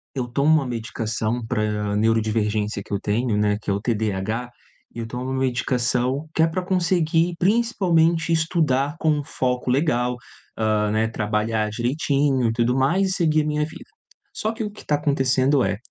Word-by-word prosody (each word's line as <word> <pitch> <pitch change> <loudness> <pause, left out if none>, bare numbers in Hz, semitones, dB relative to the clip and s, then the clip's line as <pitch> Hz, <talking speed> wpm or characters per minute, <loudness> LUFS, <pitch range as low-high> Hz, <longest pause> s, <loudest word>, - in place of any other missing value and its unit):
eu 125 -2 -2
tomo 140 +5 +2
uma 155 -3 +4
medicação 115 -1 -3
para 105 -2 -1
neurodivergência 110 -1 0
que - - -18
eu 100 - 0
tenho 110 +2 0
né, 105 0 +2
que - - -6
é - - +2
o 100 - -1
TDAH, 110 +1 -2 0.5
e - - -6
eu 115 - -3
tomo 125 +3 -4
medicação 130 +1 0
que - - +1
é 160 - +5
pra 180 +3 -3
conseguir, 175 -2 +1
principalmente, 175 -6 +2
estudar 155 -4 +1
com 160 - +2
um 150 -1 0
foco 125 -2 -2
legal, 125 -3 +1 0.4
ah, 110 -1 +1
né, 110 +1 +1
trabalhar 110 0 -1
direitinho 135 +2 +1
e - - 0
tudo 120 +2 +1
mais 175 +9 +2
e - - -1
seguir 155 -4 +2
a - - -3
minha 150 0 0
vida. 160 - -11 0.5
Só 215 - -2
que 225 0 -5
o 210 - -4
que 210 - -13
tá 150 - +2
acontecendo 135 -2 +2
é: - - -1
125 Hz, 175 wpm, -23 LUFS, 110-155 Hz, 0.5 s, é